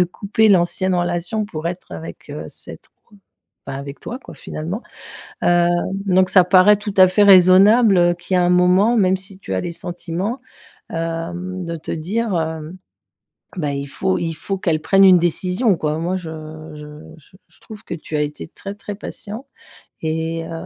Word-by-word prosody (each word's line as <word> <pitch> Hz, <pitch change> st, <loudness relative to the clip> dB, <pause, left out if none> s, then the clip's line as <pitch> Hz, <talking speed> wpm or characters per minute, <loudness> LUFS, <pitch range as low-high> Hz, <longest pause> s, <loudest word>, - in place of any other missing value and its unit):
de 180 Hz, -, +5 dB
couper 210 Hz, +4 st, 0 dB
l'ancienne 185 Hz, 0 st, +2 dB
relation, 175 Hz, +5 st, -1 dB
pour 165 Hz, -5 st, -6 dB
être 180 Hz, +1 st, -7 dB
avec, 165 Hz, -, -9 dB
heu, -, -, -6 dB
cette -, -, -9 dB
autre -, -, -25 dB, 0.8 s
bah, 135 Hz, -, -5 dB
avec 140 Hz, +1 st, -8 dB
toi, 245 Hz, -, -6 dB
quoi, -, -, -13 dB
finalement, 170 Hz, +9 st, -6 dB, 0.6 s
heu, 175 Hz, 0 st, +4 dB, 0.4 s
donc 185 Hz, 0 st, +3 dB
ça 185 Hz, -, +7 dB
paraît 185 Hz, +3 st, +6 dB
tout 205 Hz, -1 st, -6 dB
à 185 Hz, 0 st, +8 dB
fait 205 Hz, +3 st, +3 dB
raisonnable, 195 Hz, +3 st, +6 dB
heu, 175 Hz, 0 st, +4 dB
qu'il 175 Hz, +2 st, -5 dB
y -, -, +4 dB
a 180 Hz, -, +3 dB
un 175 Hz, -, +2 dB
moment, 180 Hz, +6 st, +4 dB
même 190 Hz, -2 st, +3 dB
si 190 Hz, 0 st, -9 dB
tu 95 Hz, -, -5 dB
as 95 Hz, -, 0 dB
des 170 Hz, -, -5 dB
sentiments, 175 Hz, +7 st, -4 dB, 0.5 s
hem, 170 Hz, +2 st, -4 dB
de 170 Hz, -, -4 dB
te 155 Hz, -, -7 dB
dire, 200 Hz, +7 st, -2 dB
hem, 160 Hz, +2 st, -5 dB, 0.8 s
bah,: 150 Hz, -5 st, -2 dB
«Il 140 Hz, 0 st, -4 dB
faut 185 Hz, +7 st, -1 dB
il 165 Hz, -1 st, -2 dB
faut 195 Hz, +5 st, -4 dB
qu'elle 160 Hz, -4 st, 0 dB
prenne 195 Hz, +5 st, +4 dB
une 185 Hz, -2 st, +8 dB
décision», 180 Hz, +4 st, +1 dB
quoi. 155 Hz, 0 st, -2 dB
Moi 180 Hz, +3 st, -1 dB
je 175 Hz, -3 st, -6 dB, 0.5 s
je 150 Hz, 0 st, -11 dB, 0.2 s
je 160 Hz, +5 st, -21 dB
je -, -, -25 dB
trouve 220 Hz, 0 st, -12 dB
que -, -, -5 dB
tu 155 Hz, -1 st, -5 dB
as -, -, 0 dB
été 150 Hz, +2 st, -5 dB
très, 195 Hz, +4 st, -8 dB
très 205 Hz, 0 st, -8 dB
patient 220 Hz, +5 st, -8 dB, 0.6 s
et 160 Hz, +1 st, -2 dB
heu, -, -, -9 dB
180 Hz, 190 wpm, -20 LUFS, 165-195 Hz, 0.8 s, à